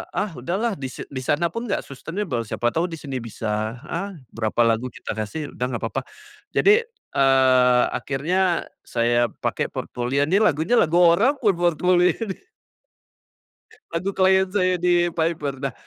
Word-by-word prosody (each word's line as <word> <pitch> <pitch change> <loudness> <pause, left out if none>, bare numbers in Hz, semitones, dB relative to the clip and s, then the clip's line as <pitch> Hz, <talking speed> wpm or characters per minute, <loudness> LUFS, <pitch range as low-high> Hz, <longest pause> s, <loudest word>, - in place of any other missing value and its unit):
ah, 205 -1 -1
udahlah 195 - -2
di 135 - -3
di 130 +1 -7
sana 165 +5 +1
pun 230 +6 -5
enggak 200 - -1
sustainable, 140 - -4
siapa 120 +2 -1
tahu 165 +6 0
di 165 - -6
sini 140 -4 -5
bisa, 110 -1 -3 0.2
ah, 195 +4 -3 0.2
berapa 110 +1 -1
lagu 115 +2 +1
kita 125 - -7
kasih 145 +8 -4
udah 125 - -3
enggak 120 -3 -4
apa-apa. 115 +4 -2 0.5
Jadi, 420 +3 +6 0.3
eee, 130 -2 +4
akhirnya 175 +6 0 0.2
saya 120 0 +2
pakai - - -3
portfolio. 125 +3 -2
Nih, 180 +7 +2
lagunya 190 - +3
lagu 165 +1 +2
orang 180 +10 +5
buat 195 -5 +2 0.2
portfolio 180 +2 +3
nih. 195 -4 -7 1.5
Lagu 165 +4 -2
klien 190 0 +4
saya 185 -2 +2
di 175 0 +3
Piper. 160 -4 0
Nah, 135 -2 -2
160 Hz, 150 wpm, -23 LUFS, 125-185 Hz, 1.5 s, Jadi